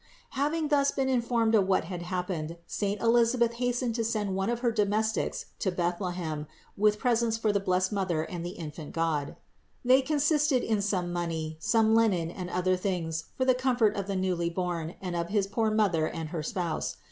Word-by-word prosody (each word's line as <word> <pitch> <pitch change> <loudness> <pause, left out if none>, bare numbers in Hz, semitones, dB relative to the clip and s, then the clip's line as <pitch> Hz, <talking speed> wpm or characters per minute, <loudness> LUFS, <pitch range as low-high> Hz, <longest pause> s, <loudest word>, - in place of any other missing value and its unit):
491. 275 0 -1
Having 310 +1 0
thus 280 -2 +3
been 270 -1 -1
informed 235 -3 +1
of 200 -4 +4
what 190 - +2
had 175 +1 -6
hap 180 0 -3
pened, 165 -2 -4
saint 205 +2 -2
Elisabeth 235 0 +3
hastened 245 0 -1
to 230 0 -1
send 215 -3 -1
one 195 +3 0
of 240 0 -1
her 240 -2 +2
domes 215 0 +1
tics - - -3
to 190 - 0
Bethlehem 175 -3 -2 0.3
with 210 +1 +3
presents 235 -2 +1
for 220 -1 +1
the 200 - +1
blessed 185 0 +1
Mother 185 -6 0
and 170 +1 -6
the 175 +1 -6
infant 155 -1 -7
God. 160 -4 -1 0.5
They 260 +2 +6
consisted 295 -1 +2
in 215 -2 +1
some 185 -3 -1
money, 165 -2 -3
some 220 +4 +3
linen 195 -8 +3
and 180 0 -6
other 180 +1 +1
things 170 -4 -2
for 260 - +1
the 260 - +5
comfort 250 -4 +2
of 200 -2 -3
the 200 - -2
newly 180 -2 0
born 170 -2 -3
and 180 -2 -3
of 170 0 -2
his 205 -2 +1
poor 220 +3 0
Mother 195 -8 +2
and 160 -2 -5
her 165 -1 -3
spouse. 170 +1 -3
195 Hz, 200 wpm, -28 LUFS, 175-230 Hz, 0.5 s, They